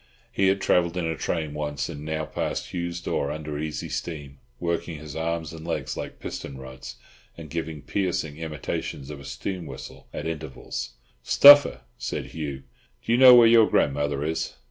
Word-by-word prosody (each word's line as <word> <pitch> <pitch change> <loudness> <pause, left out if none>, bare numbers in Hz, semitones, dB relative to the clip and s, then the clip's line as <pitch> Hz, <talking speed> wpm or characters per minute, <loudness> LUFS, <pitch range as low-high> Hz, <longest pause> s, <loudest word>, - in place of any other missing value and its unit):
He 95 - +2
had 95 +1 +2
travelled 85 0 +2
in 90 - -1
a 80 0 -1
train 80 -2 -2
once, 75 -1 -3
and 75 - -7
now 80 0 -2
passed - - -4
Hugh's 85 -1 -3
door 70 -4 -2
under 75 -1 -5
easy 75 0 -4
steam, 70 -5 -6 0.2
working 85 -1 -2
his 75 -1 -9
arms 80 0 -2
and 80 -1 -9
legs 75 -6 -3
like - - -6
piston 70 - -6
rods, 65 -1 -9 0.4
and 80 -3 -10
giving 80 -3 -4
piercing 80 -3 -2
imitations 75 -3 -5
of 75 - -8
a - - -11
steam 80 +7 -5
whistle - - -10
at 75 - -6
intervals. 70 -6 -5 0.3
"Stuffer," 145 - +8 0.2
said - - -4
Hugh, 70 -4 -5 0.4
"do - - -1
you 120 - +4
know 130 -1 +10
where 120 -1 +8
your 115 -1 +6
grandmother 75 0 +1
is?" 80 +1 -2
80 Hz, 175 wpm, -25 LUFS, 75-85 Hz, 0.4 s, know